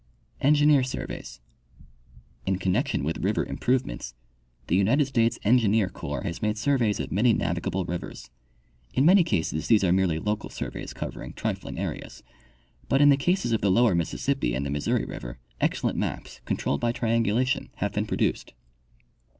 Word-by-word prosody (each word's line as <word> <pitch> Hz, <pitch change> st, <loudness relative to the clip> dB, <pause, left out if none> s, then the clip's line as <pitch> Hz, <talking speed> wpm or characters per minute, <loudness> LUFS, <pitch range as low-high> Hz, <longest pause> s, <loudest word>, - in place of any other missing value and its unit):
Engineer 145 Hz, 0 st, +5 dB
Surveys. 60 Hz, -, -6 dB, 0.5 s
— -, -, -29 dB
In 95 Hz, -1 st, +1 dB
connection 95 Hz, -6 st, 0 dB
with 80 Hz, +3 st, -2 dB
river 105 Hz, +3 st, +1 dB
improvements, 125 Hz, -, -2 dB, 0.5 s
the 85 Hz, -, +1 dB
United 115 Hz, +10 st, +3 dB
States 115 Hz, -4 st, +1 dB
Engineer 110 Hz, -3 st, +3 dB
corps 70 Hz, -7 st, -5 dB
has 85 Hz, -, -4 dB
made 105 Hz, 0 st, 0 dB
surveys 120 Hz, -4 st, +1 dB
of -, -, -4 dB
many 115 Hz, +4 st, +3 dB
navi 85 Hz, 0 st, -1 dB
gable 95 Hz, +1 st, -2 dB
rivers. 85 Hz, -8 st, -6 dB, 0.6 s
In 135 Hz, -, +3 dB
many 185 Hz, +2 st, +7 dB
cases 80 Hz, -, -1 dB
these 110 Hz, -3 st, +4 dB
are 90 Hz, -, +3 dB
merely 90 Hz, -3 st, +2 dB
local 105 Hz, +5 st, -2 dB
surveys -, -, -6 dB
covering -, -, -6 dB
trifling -, -, -4 dB
areas, -, -, -5 dB, 0.7 s
but 135 Hz, -, +3 dB
in 145 Hz, 0 st, +7 dB
the 140 Hz, -, +7 dB
cases 175 Hz, 0 st, 0 dB
of 115 Hz, -, +1 dB
the 100 Hz, -, +2 dB
lower 110 Hz, +2 st, +4 dB
Mississippi 85 Hz, -, -1 dB
and 70 Hz, +2 st, -2 dB
the 70 Hz, -, -3 dB
Missouri 70 Hz, 0 st, 0 dB
river -, -, -7 dB, 0.2 s
excellent -, -, 0 dB
maps, -, -, -4 dB
controlled 70 Hz, -, -1 dB
by 120 Hz, -, +2 dB
triangula 115 Hz, 0 st, +1 dB
tion, 130 Hz, -, -2 dB
have -, -, -2 dB
been -, -, -1 dB
produced. -, -, -1 dB
105 Hz, 165 wpm, -26 LUFS, 85-125 Hz, 0.7 s, many